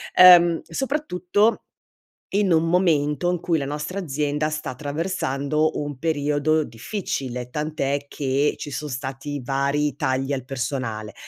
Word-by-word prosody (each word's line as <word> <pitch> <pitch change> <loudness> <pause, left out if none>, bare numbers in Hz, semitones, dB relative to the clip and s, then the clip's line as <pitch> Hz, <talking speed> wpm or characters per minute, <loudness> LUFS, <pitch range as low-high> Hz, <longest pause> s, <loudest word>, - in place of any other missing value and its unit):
ehm, 175 -2 +8
soprattutto, 215 - 0 0.7
in 200 -2 +2
un 165 +1 +3
momento 165 -2 +2
in 175 - -1
cui 170 -2 +1
la 140 - -2
nostra 150 +7 -4
azienda 150 -1 -1
sta 155 -3 -4
attraversando 150 0 -1
un 145 -2 -5
periodo 155 0 +1
difficile, 125 - -4
tant'è 145 -1 -2
che 140 +1 0
ci 145 - -6
son 150 +2 -4
stati 135 +2 -5
vari 140 +3 0
tagli 135 +2 -1
al 130 -3 -3
personale. 120 -5 -4
150 Hz, 130 wpm, -23 LUFS, 135-165 Hz, 0.7 s, ehm